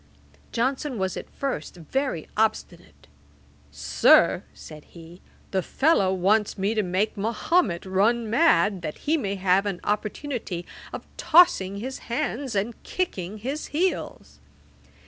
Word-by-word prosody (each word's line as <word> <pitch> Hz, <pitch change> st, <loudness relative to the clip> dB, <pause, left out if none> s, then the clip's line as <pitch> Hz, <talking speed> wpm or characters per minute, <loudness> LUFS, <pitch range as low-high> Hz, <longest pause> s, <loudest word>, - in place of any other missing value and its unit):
Johnson 260 Hz, +2 st, -1 dB
was 190 Hz, -2 st, -2 dB
at -, -, -7 dB
first 270 Hz, -, -4 dB
very 175 Hz, -, -3 dB
obstinate. 170 Hz, -, -2 dB, 0.6 s
'Sir, 70 Hz, -1 st, +4 dB
(said 155 Hz, -1 st, -12 dB
he) 170 Hz, +1 st, -14 dB, 0.3 s
the 190 Hz, -, +1 dB
fellow 235 Hz, -, +2 dB
wants 200 Hz, +3 st, +1 dB
me 200 Hz, +3 st, 0 dB
to 220 Hz, -, +1 dB
make 190 Hz, +3 st, -1 dB
Mahomet 215 Hz, -, 0 dB
run 215 Hz, +5 st, +1 dB
mad, 210 Hz, -, +3 dB
that 155 Hz, -2 st, -5 dB
he 310 Hz, -, +3 dB
may 200 Hz, -10 st, -2 dB
have 190 Hz, +1 st, +2 dB
an 195 Hz, -3 st, -3 dB
opportunity 210 Hz, -3 st, -3 dB, 0.3 s
of -, -, -7 dB
tossing 200 Hz, -, +4 dB
his 260 Hz, +6 st, -5 dB
hands 260 Hz, -1 st, -2 dB
and 210 Hz, +4 st, -2 dB
kicking 210 Hz, -, -3 dB
his 270 Hz, +8 st, -4 dB
heels.' 360 Hz, +5 st, -2 dB
205 Hz, 125 wpm, -25 LUFS, 180-260 Hz, 0.6 s, Sir